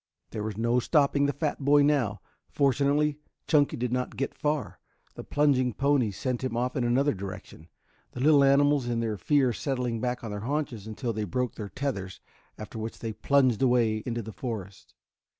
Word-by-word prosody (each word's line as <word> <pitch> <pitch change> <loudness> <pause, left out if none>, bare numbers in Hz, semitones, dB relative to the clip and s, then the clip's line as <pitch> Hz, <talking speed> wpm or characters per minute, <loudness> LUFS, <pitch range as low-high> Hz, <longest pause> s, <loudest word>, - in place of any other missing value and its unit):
There 110 - -4
was 105 -1 -4
no 120 +2 +2
stopping 140 +1 +2
the - - +1
fat 145 +1 -2
boy 145 +1 +5
now. 135 -8 +1 0.3
Fortunately 145 +2 +1 0.3
Chunky 145 -2 +2
did 125 0 -2
not 125 0 -2
get 135 - -2
far. 150 -1 -2 0.3
The - - -8
plunging 135 -4 +2
ponies 135 -7 +1
sent 125 -1 -2
him 125 -3 -2
off 125 +1 -1
in 125 - 0
another 130 +5 +2
direction, 95 -4 -8 0.5
the - - -7
little 145 0 +6
animals 140 -1 +4
in 120 -1 -1
their 115 -2 -1
fear 135 +3 +2
settling 125 -2 -2
back 125 -1 -2
on 110 - -5
their 105 - -4
haunches 125 -3 -3
until 115 +2 -3
they 110 0 -2
broke 125 +6 -2
their 105 -2 -7
tethers, 100 -10 -4 0.4
after 110 +1 -8
which 110 +1 -5
they 115 -1 -5
plunged 130 +1 +2
away 120 -4 +2
into 120 -1 -3
the 110 +1 -8
forest. 100 -6 -7
125 Hz, 185 wpm, -27 LUFS, 110-140 Hz, 0.5 s, little